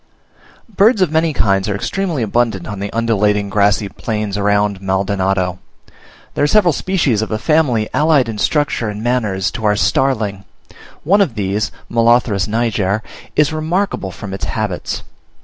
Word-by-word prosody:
Birds 210 -1 +3
of 170 - -1
many 160 +1 +2
kinds 100 -7 +1
are 100 - -1
extremely 160 - -2
abundant 110 -4 0
on 105 -2 -6
the 100 +1 -4
undulating, 105 -3 +1
grassy 100 0 +2
plains 105 -1 -4
around 105 -1 +1
Maldonado. 95 -1 0 0.7
There - - 0
are - - +4
several 180 -1 +4
species 145 - 0
of 110 - -3
a 110 - -1
family 130 -5 +1
allied 150 -5 +3
in 110 -2 -5
structure 145 -6 0
and 105 +1 -6
manners 110 -6 0
to 115 - -7
our 105 -1 +3
Starling: 105 -5 0 0.6
one 200 +6 +3
of 145 - 0
these 105 0 -1 0.2
(Molothrus 115 -4 +2
niger) 110 -2 0 0.3
is 150 0 +3
remarkable 160 - -1
from 95 +2 -8
its 95 - -4
habits. - - -3
110 Hz, 150 wpm, -17 LUFS, 100-145 Hz, 0.7 s, are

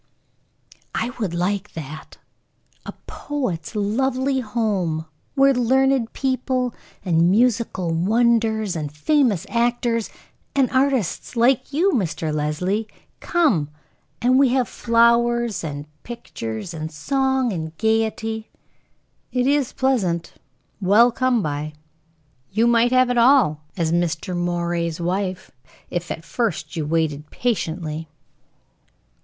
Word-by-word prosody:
"I 235 +2 -1
would 190 -6 -2
like 195 +3 -1
that. 155 -1 -8 0.7
A - - -3
poet's 250 - -4
lovely 260 +6 0
home, 205 -9 -1 0.3
where 275 0 +5
learned 260 0 +2
people, 255 -2 -1 0.3
and 170 -1 +3
musical 220 -5 +1
wonders, 220 +2 +2
and 150 -3 -3
famous 220 - +1
actors, 235 0 0 0.5
and 270 -2 +3
artists 260 - 0
like 240 +4 +2
you, 345 +7 +2
Mr. 165 - -1
Leslie, 180 +8 -1 0.3
come; 270 - +1 0.5
and 255 +2 +4
we 275 -2 +5
had 255 0 +1
flowers, 235 -3 +2
and 145 -2 -5 0.2
pictures, 170 - -6
and 160 0 -5
song, 265 - 0
and 160 -2 -5
gayety." 220 0 0 0.8
"It 250 -1 +1
is 280 -1 +2
pleasant, 190 -11 0 0.5
well 210 +6 +5
come 245 -2 +1
by. 150 +1 -3 0.8
You 220 +4 +2
might 235 0 +4
have 255 -1 +4
it 245 - +2
all, 235 - +4 0.2
as 165 -3 0
Mr. 175 +1 -1
Moray's 175 -1 -1
wife, 185 +2 -2 0.4
if 175 0 -3
at 165 - -5
first 175 -10 -2
you 155 -3 -2
waited 155 -2 -1
patiently." 165 -9 -2
220 Hz, 115 wpm, -22 LUFS, 170-250 Hz, 0.8 s, where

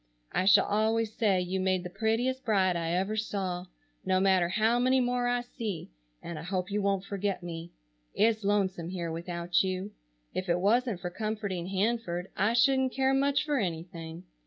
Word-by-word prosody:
I 185 - 0
shall 195 - +6
always 220 +1 +1
say 205 -5 +2
you 180 +1 -2
made 185 -1 +1
the 180 - -5
prettiest 240 +6 0
bride 190 -5 +2
I 165 -1 -1
ever 190 +5 0
saw, 190 -4 -3 0.4
no 185 0 +2
matter 190 -2 +3
how 225 +5 +2
many 255 +1 +3
more 245 -1 +1
I 245 0 +1
see, 225 - -6 0.3
and 170 -2 -6
I - - -6
hope 180 +2 -3
you 205 +1 0
won't 195 -1 0
forget 200 -2 -2
me. 170 0 -6 0.4
It's 220 +1 +2
lonesome 190 -4 0
here 175 -3 -3
without 170 +1 0
you. 190 +2 -3 0.4
If 185 0 -3
it 170 +1 +2
wasn't 220 0 +2
for 180 -2 -4
comforting 205 -3 -3
Hanford 195 -2 -1
I 210 +4 +2
shouldn't 265 +1 +3
care 265 0 +2
much 280 +2 +2
for 295 -3 +1
anything. 165 -2 -5
195 Hz, 180 wpm, -29 LUFS, 180-225 Hz, 0.4 s, shall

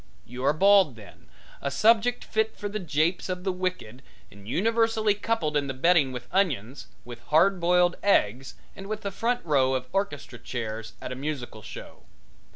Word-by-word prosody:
You 125 +2 -8
are - - +5
bald 195 - +5
then, 105 -3 -15 0.3
a 140 - -1
subject 230 - +3
fit 220 0 -1
for 205 - -4
the 210 +1 -4
japes 165 +1 0
of 180 0 -4
the 190 - 0
wicked 180 -10 -4 0.3
and 100 0 -15
universally 225 - +2
coupled 205 -7 -2
in 145 -1 +1
the 135 - -4
betting 155 -1 +3
with 125 -1 -7
onions, 135 - -1 0.2
with 120 -1 -10
hard 180 +5 +3
boiled 175 +1 +3
eggs 130 - +1 0.2
and 195 - -9
with 215 +1 -4
the 200 - -4
front 240 +5 -1
row 135 -4 +2
of 130 -1 -2
orchestra 145 -11 -3
chairs 115 -2 -5
at - - -5
a - - -4
musical 135 -5 -5
show. - - -11
170 Hz, 175 wpm, -26 LUFS, 130-200 Hz, 0.3 s, are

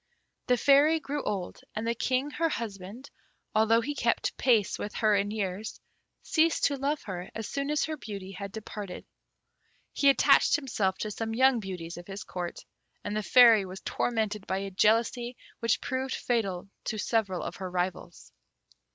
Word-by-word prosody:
The 250 - +4
Fairy 285 +5 +5
grew 290 -1 -3
old, 195 -4 -3 0.2
and 215 +1 -2
the 230 - +1
King, 255 +4 -1
her 330 +1 0
husband, 220 0 -6 0.4
although 220 +1 +4
he 290 +5 -3
kept - - 0
pace 225 -6 +2
with 205 - -5
her 215 -2 +3
in 200 0 +1
years, 205 0 -4 0.4
ceased 325 +1 +2
to 285 - +3
love 280 +2 -2
her 185 -2 -6
as 225 -1 -4
soon 280 0 -3
as 300 0 +1
her 310 -1 -3
beauty 200 -6 -7
had 195 +1 -7
departed. 205 -3 -7 0.9
He 280 - +4
attached 275 - +5
himself 210 -10 -1
to 215 - -2
some 225 +1 -3
young 260 0 +4
beauties 180 -5 -6
of 175 - -10
his 195 0 -6
Court, 175 -1 -6 0.4
and 205 - -3
the 215 - 0
Fairy 225 +1 +7
was 190 0 -8
tormented 215 -4 -1
by 190 - 0
a 195 0 -4
jealousy 230 +5 +2 0.2
which 230 -1 +1
proved 260 0 -2
fatal 200 -6 -1 0.2
to 215 - -2
several 205 -4 0
of - - -6
her 190 -1 -5
rivals. 180 0 -4
220 Hz, 170 wpm, -29 LUFS, 195-255 Hz, 0.9 s, Fairy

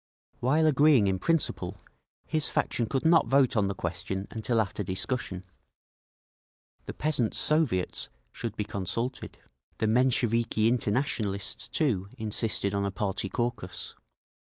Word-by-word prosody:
While 150 +6 +3
agreeing 145 -5 +5
in 95 -1 +1
principle, 105 - 0 0.5
his 155 -2 +1
faction 115 - 0
could 135 +5 -2
not 165 0 +5
vote 135 -3 +3
on 105 -3 +2
the 100 - -3
question 95 +3 -4
until 115 +1 0
after 105 -1 -1
discussion. 95 0 -3 1.4
The - - -4
Peasants' 135 -7 0
Soviets 150 - +1 0.2
should 115 -2 -5
be 105 - -1
consulted…. 105 +6 -4 0.4
The - - 0
Mensheviki 115 -1 +2
Internationalists, 110 -3 -1
too, 105 - 0
insisted 110 -2 -1
on 100 0 0
a 100 - 0
party 95 0 -2
caucus. 120 -6 -3
110 Hz, 125 wpm, -28 LUFS, 100-130 Hz, 1.4 s, agreeing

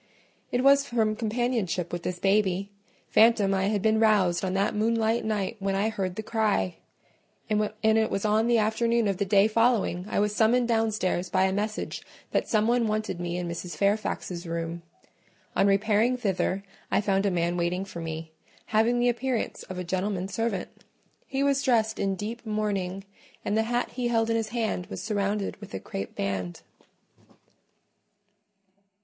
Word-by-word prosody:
It 245 +1 +1
was 275 0 +6
from 225 -4 0
companionship 220 -6 -1
with 175 - -2
this 180 +1 -3
baby 195 0 +1 0.4
phantom 215 -3 +5
I 190 0 +1
had 205 -1 0
been 220 0 +3
roused 195 -6 +3
on 185 0 -1
that 195 +1 +1
moonlight 225 +1 +1
night 215 0 -2
when 195 0 -1
I 205 +3 +1
heard 190 -4 -3
the 220 - -4
cry; 215 - 0 0.7
and 210 0 +1 0.2
it 220 0 +3
was 195 - -2
on 215 +2 +3
the 240 -1 +4
afternoon 225 +1 +2
of 195 -2 0
the 200 - 0
day 200 +1 +5
following 220 -5 +1
I - - -2
was 210 0 +1
summoned 235 +2 +3
downstairs 215 -6 0
by 185 +2 +2
a 190 0 +2
message 210 +2 -3 0.3
that - - 0
some 215 -1 +2
one 240 -1 +2
wanted 215 -4 -2
me 175 0 -3
in 180 -1 -3
Mrs. 170 +1 -5
Fairfax's 200 -4 -1
room. 165 0 -3 0.7
On 200 - +4
repairing 215 +5 +3
thither, 195 -3 -1 0.3
I - - +2
found 200 -1 +1
a - - +3
man 175 -1 0
waiting 175 +2 -1
for 175 -3 -8
me, 160 0 -5 0.4
having 225 +3 +3
the 245 0 +3
appearance 245 0 -2
of 185 - -5
a 180 - -3
gentleman's 190 +1 -2
servant: 225 -5 -3 0.4
he 270 +1 -1
was 280 -1 +2
dressed 225 -5 +1
in 195 -1 0
deep 220 +5 -5
mourning, 200 -4 -2 0.4
and 205 - 0
the 220 - +3
hat 245 0 0
he 245 -1 -2
held 230 -1 +1
in - - +2
his 225 -1 -1
hand 220 -5 -2
was - - -6
surrounded 205 -1 -1
with 205 - -9
a - - -3
crape 95 +1 -6
band. 95 -3 -3
210 Hz, 175 wpm, -27 LUFS, 185-225 Hz, 0.7 s, was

